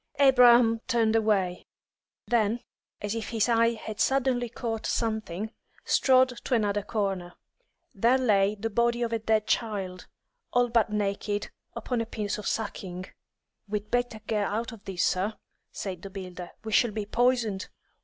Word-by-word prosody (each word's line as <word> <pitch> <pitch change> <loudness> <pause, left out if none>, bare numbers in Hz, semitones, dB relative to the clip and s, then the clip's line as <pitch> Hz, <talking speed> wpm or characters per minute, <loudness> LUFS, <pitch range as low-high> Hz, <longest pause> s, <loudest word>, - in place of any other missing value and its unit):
Abraham 245 -4 +6
turned 230 -3 +2
away; 200 -5 +1 0.6
then, 230 0 +1 0.4
as 205 0 -1
if 225 -2 -4
his 225 -1 +1
eye 230 0 +3
had 220 -1 -7
suddenly 255 -2 +2
caught 225 -1 -4
something, 220 -3 -2 0.3
strode 260 -1 +4
to 255 - +1
another 205 -2 +1
corner. 195 -4 -2 0.6
There 235 +6 +3
lay 210 -5 +3
the 225 +2 -4
body 235 +2 +2
of 230 -1 -2
a 230 - +1
dead 220 -1 +1
child, 195 -6 -2 0.5
all 245 0 +3
but 230 -2 +3
naked, 205 0 -2 0.2
upon 245 -3 -2
a 230 - -4
piece 210 -2 -3
of 210 - -5
sacking. 185 -4 -4 0.6
"We'd 210 0 -3
better 245 -2 0
get 210 -2 0
out 230 +4 -2
of 225 -3 -13
this, 185 -2 -1
sir," 195 +4 +1 0.4
said 185 -4 -5
the 195 - -7
builder. 185 -2 -7
"We 220 - -5
shall 240 +2 +4
be 215 -1 -4
poisoned. 230 -3 +1
220 Hz, 155 wpm, -28 LUFS, 200-235 Hz, 0.6 s, Abraham